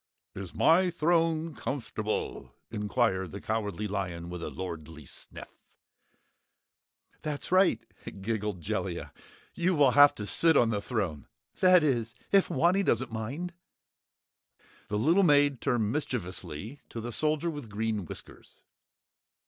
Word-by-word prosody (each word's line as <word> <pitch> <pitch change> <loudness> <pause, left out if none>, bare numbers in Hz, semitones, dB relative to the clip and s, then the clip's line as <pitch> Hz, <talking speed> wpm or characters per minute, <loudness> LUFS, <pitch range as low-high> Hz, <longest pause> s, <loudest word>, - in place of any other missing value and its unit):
"Is 95 -3 -7
my 180 +3 +5
throne 165 -1 +1
comfortable?" 110 -7 -4 0.2
inquired 95 -3 0
the 100 - -6
Cowardly 105 -1 -2
Lion 90 -4 -4
with 90 -1 -6
a - - -4
lordly 80 -4 -7
sniff. - - -10 1.7
"That's 150 +1 -4
right," 185 +1 +4 0.4
giggled 105 -2 -2
Jellia, - - -3 0.4
"you 180 +1 +1
will 140 -4 +5
have 145 +2 +7
to 105 - -5
sit 165 +8 +4
on 115 -1 +4
the 105 -2 -1
throne 95 - -3 0.3
that 185 -2 +6
is, 120 -5 0 0.2
if 195 -1 +4
Wanny 175 +8 +3
doesn't 130 - +1
mind?" 135 +11 -4 1.3
The 105 - -1
little 165 - +4
maid 145 -6 +4
turned 110 -4 +1
mischievously 105 - -4
to 115 - -6
the 120 +2 -5
Soldier 155 +6 +1
with 145 -7 -8
Green 110 0 -2
Whiskers. - - -10
115 Hz, 125 wpm, -29 LUFS, 100-155 Hz, 1.7 s, have